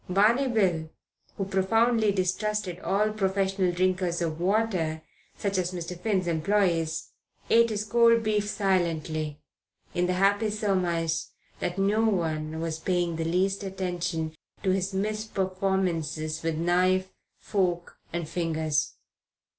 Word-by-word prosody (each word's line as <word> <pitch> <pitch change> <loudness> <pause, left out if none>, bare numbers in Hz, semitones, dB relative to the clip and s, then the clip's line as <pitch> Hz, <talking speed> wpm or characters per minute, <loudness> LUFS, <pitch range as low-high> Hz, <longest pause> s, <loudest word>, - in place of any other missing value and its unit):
Barney 220 +8 +4
Bill, 185 -9 +1 0.5
who 195 - -1
profoundly 220 +3 +2
distrusted 190 0 -1
all 210 +3 +1
professional 195 -2 +1
drinkers 180 -1 0
of 165 -1 -2
water, 180 -6 0 0.3
such 200 -2 -1
as 180 0 -1
Mr. 175 0 -5
Finn's 190 -2 0
employees, 165 -1 +1 0.4
ate 230 0 +6
his 210 -1 -1
cold 230 0 +4
beef 210 -1 0
silently, 160 -6 -1 0.5
in 180 0 +1
the 180 - +1
happy 200 +3 +2
surmise 180 -6 0 0.3
that 180 +1 -2
no 205 +3 +2
one 160 -6 0
was 160 -1 -3
paying 175 -1 0
the 165 - -1
least 190 +4 +1
attention 180 -4 -3 0.3
to 190 - +2
his 190 +1 0
misperformances 190 -6 -1
with 165 -1 -1
knife, 185 +3 +2 0.3
fork 180 -4 -1
and 170 -2 -3
fingers. 155 -3 -1
185 Hz, 125 wpm, -27 LUFS, 170-200 Hz, 0.5 s, ate